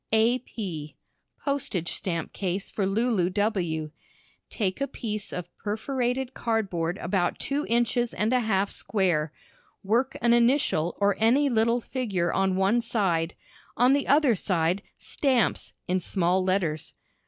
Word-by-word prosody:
A. 225 +3 +4
P. 165 - -6 0.5
Postage 260 - -1
stamp 170 -5 -3
Case 190 0 -3
for 195 -3 -1
Lulu 205 -3 +1
W. 180 -7 -1 0.6
Take 200 +2 -2
a 275 - +1
piece 215 -6 -5
of 175 -1 -6
perforated 250 +4 -2
card 225 -4 -1
board 170 +1 -1
about 175 -1 0
two 285 +2 -2
inches 240 0 +1
and 220 +4 0
a 250 - +4
half 205 -4 +1
square, 175 -7 0 0.5
work 240 +7 +1
an 235 0 +3
initial 240 - +2
or 200 -1 +3
any 260 +6 +4
little 230 0 +2
figure 200 -10 -1
on 190 -1 +1
one 195 +5 +2
side, 185 -8 0 0.4
on 250 +3 +5
the 280 0 +1
other 285 -2 +5
side 180 -1 0 0.2
"Stamps" 260 -5 0
in 185 +1 +1
small 185 +1 +1
letters. 180 -5 -1
205 Hz, 140 wpm, -26 LUFS, 180-240 Hz, 0.6 s, on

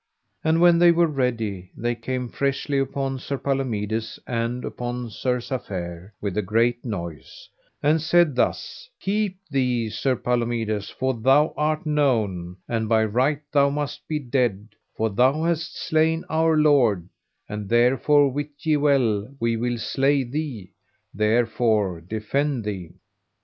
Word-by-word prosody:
And 160 +1 +3
when 175 -1 +6
they 175 0 +7
were 170 0 +4
ready 115 - -2
they 120 +1 -1
came 125 +1 -4
freshly 140 +2 -1
upon 135 0 -2
Sir 140 +2 -4
Palomides 115 -6 -2
and 120 +1 -2
upon 120 -1 -5
Sir 125 +3 -1
Safere 95 -8 -5
with 100 -3 -3
a 105 - +1
great 115 +4 +1
noise, 85 - -7 0.4
and 155 +2 +3
said 170 -2 +3
thus: 485 - -2
Keep 200 -1 -1
thee, 125 -5 0
Sir 130 +5 0
Palomides, 115 -4 -1
for 130 +1 -1
thou 135 +6 +3
art 155 +3 0
known, 110 - 0
and 110 -2 -1
by 110 -1 +4
right 130 +7 +1
thou 140 -1 +4
must 145 0 -4
be 155 - -1
dead, 120 -7 -1 0.3
for 110 0 0
thou 130 +9 +3
hast 165 -1 -1
slain 160 +1 +1
our 160 0 +3
lord; 125 - +3 0.4
and 105 -1 -6
therefore 135 +5 +4
wit 145 +3 -3 0.2
ye 155 -1 +3
well 130 -7 +2
we 115 0 +1
will 120 +1 -1
slay 135 +4 +1
thee, 125 - -5 0.4
therefore 110 -4 +1
defend 110 - -2
thee. 95 -5 -5
125 Hz, 140 wpm, -24 LUFS, 110-145 Hz, 0.4 s, they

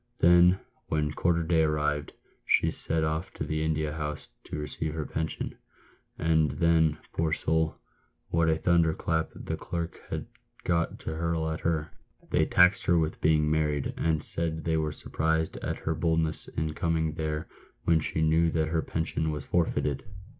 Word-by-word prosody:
Then, 90 +2 +6 0.3
when 75 -1 0
quarter 85 +2 +1
day 80 0 +3
arrived, 75 -1 0 0.3
she - - +3
set 80 0 0
off 80 +3 -1
to - - -3
the 80 0 -1
India 80 -1 0
House 75 -1 -5 0.2
to - - -5
receive 75 +1 -4
her 80 -2 -2
pension! 80 +2 -4 0.6
and 80 -1 +3
then, 80 0 +3 0.2
poor 80 -1 0
soul! 80 0 +1 0.5
what 80 0 +2
a 80 - +3
thunderclap 80 -1 +2
the - - -4
clerks 85 -1 -4
had - - -3 0.4
got 85 -1 0
to - - -4
hurl 80 0 -1
at 80 - -3
her. 80 -2 -1 0.4
They - - +3
taxed 90 +3 +5
her 85 - +5
with 80 -1 -1
being 75 -1 +3
married, 75 -2 0
and 80 -2 0
said 80 -1 0
they 80 -1 +1
were 80 -1 0
surprised 80 +1 -1
at - - -3
her 80 - -2
boldness 80 -1 0
in 80 0 -3
coming 80 -1 0
there 80 -1 -3 0.4
when 85 -1 +4
.she 80 +1 -2
knew 80 +1 +4
that 80 -1 0
her 80 0 +1
pension 80 -1 -2
was 75 -2 -4
forfeited." 75 -5 0
80 Hz, 165 wpm, -28 LUFS, 75-80 Hz, 0.6 s, Then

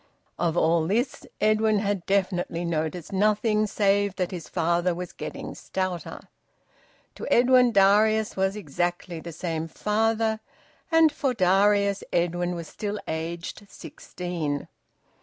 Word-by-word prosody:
Of 170 -1 0
all 160 0 +3
this, 235 +8 -1
Edwin 215 0 +3
had 200 -3 -1
definitely 180 -3 0
noticed 160 +1 -3
nothing 210 +2 +2
save 200 -1 +1
that 185 -2 -2
his 175 -4 -7
father 170 +1 +1
was 180 0 -6
`getting - - -7
stouter.' 185 -2 -4 0.9
To - - -7
Edwin, 250 0 +5
Darius 215 +2 +4
was 190 +1 0
exactly 175 -1 -3
the 170 +1 -8
same 165 -1 -3
father, 220 +4 0 0.5
and 325 -1 +6
for 275 -4 -1
Darius, 200 +1 +3
Edwin 175 +1 0
was 170 -2 -6
still 210 +4 -4
aged 170 +5 -5
sixteen. 170 -9 -5
190 Hz, 120 wpm, -26 LUFS, 170-215 Hz, 0.9 s, and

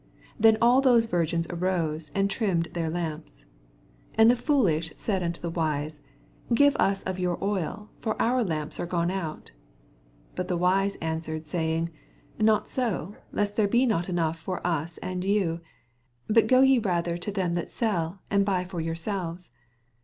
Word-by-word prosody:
7 - - -29
Then 220 0 +6
all 245 +3 +6
those 245 -4 +5
viigins 170 -4 0
arose, 165 -4 -1
and 195 0 +3
trimmed 190 -5 0
their 165 -2 -1
lamps. 160 - -5 0.7
8 - - -22
And 225 +1 +7
the - - +2
foolish 195 - +1
said 195 -4 -1
unto 170 -1 -2
the 170 - -4
wise, 155 -2 -2 0.5
Giye 285 +4 +5
us 195 0 +2
of 185 0 -3
your 180 -1 0
oil; 200 +1 -3
fi»r 235 +3 +1
ou - - +3
lamra 155 -6 -3
are - - -2
gone 170 0 0
out. 170 -5 -5 0.8
9 - - -32
But 180 - -2
the 180 -2 0
wise 195 +3 +2
answered, 160 -1 -3
saying, 165 +1 -1 0.5
Not 215 -1 +3
90; 210 - -1 0.2
lest 205 0 -1
there 215 -2 +4
be 240 +5 +3
not 190 -7 0
enough 165 -2 0
for 185 +2 -5
us 165 -1 -1
and 185 0 -3
vou: 190 -4 +1 0.7
but 225 +1 +4
go 255 0 +5
ye 265 -1 +6
rather 175 -5 0
to 205 - -4
them 185 -4 -1
that 170 -1 -3
sell, 185 -5 -1
and 200 -1 +4
buy 190 -2 0
for 180 -2 -4
yourselves. 170 - -4
180 Hz, 175 wpm, -27 LUFS, 165-210 Hz, 0.8 s, And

